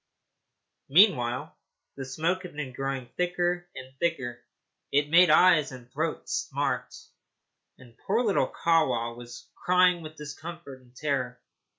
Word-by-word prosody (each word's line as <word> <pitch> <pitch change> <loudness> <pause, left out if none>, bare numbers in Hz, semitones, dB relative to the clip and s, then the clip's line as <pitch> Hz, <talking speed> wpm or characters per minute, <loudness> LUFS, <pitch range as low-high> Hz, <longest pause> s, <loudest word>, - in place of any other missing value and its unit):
Meanwhile 135 - +3 0.4
the 135 - -6
smoke 165 +8 -1
had 180 -5 -10
been 145 -4 -5
growing 135 -2 -4
thicker 175 0 0
and 130 0 -10
thicker. 125 -8 -2 0.5
It 145 +1 +1
made 175 +1 +7
eyes 155 -2 +5
and 125 -1 -12
throat 155 +3 -3
smart, - - -2 0.8
and 120 -3 -17
poor 225 +5 +2
little 210 -5 +2
Kahwa 125 -9 +1
was 120 0 -11 0.2
crying 180 -1 +4
with 155 -1 -9
discomfort 150 -1 -9
and 125 0 -24
terror. 130 -3 -2
150 Hz, 125 wpm, -27 LUFS, 130-175 Hz, 0.8 s, made